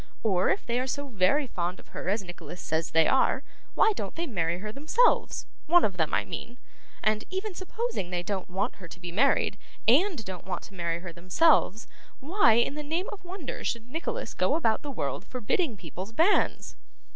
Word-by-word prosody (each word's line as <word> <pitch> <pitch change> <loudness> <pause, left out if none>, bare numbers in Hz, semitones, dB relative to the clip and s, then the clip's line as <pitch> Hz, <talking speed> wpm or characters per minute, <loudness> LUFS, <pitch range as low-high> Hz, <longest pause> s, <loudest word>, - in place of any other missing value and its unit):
Or, 190 -4 +3
if - - 0
they 240 +1 0
are 255 - -1
so 285 +2 -3
very 225 +7 +3
fond 180 -6 -3
of - - -16
her - - -4
as 205 +1 +1
Nicholas 175 -1 -9
says 160 +1 -1
they 165 -1 +4
are, 265 0 +3 0.3
why 435 - +5
don't 200 - -5
they 335 - -2
marry 175 - -1
her 210 +3 -5
themselves 310 - +2 0.2
one 345 +2 +6
of 190 -3 -2
them 160 -3 +1
I 105 - +1
mean? 240 - -7 0.5
And 215 0 +2
even 380 +2 -3
supposing 375 - -3
they 175 -1 -2
don't 190 0 -3
want 195 +6 -2
her 185 - -10
to 175 - -12
be 175 -1 -6
married, 265 +10 +2 0.3
and 290 - +4
don't 185 -1 -7
want 190 - -3
to 195 - -12
marry 170 -2 -2
her 175 -2 -7
themselves, 210 - +3 0.3
why 305 - +4
in 235 +4 +3
the 300 - -4
name 325 +6 -2
of 405 - -9
wonder 355 -5 -6
should 235 +1 -3
Nicholas 325 +3 -3
go - - +2
about 225 -9 +2
the 290 - -6
world, 140 - -3
forbidding 255 - -1
people's 185 +5 -7
banns? 335 - +2
225 Hz, 200 wpm, -28 LUFS, 180-305 Hz, 0.5 s, one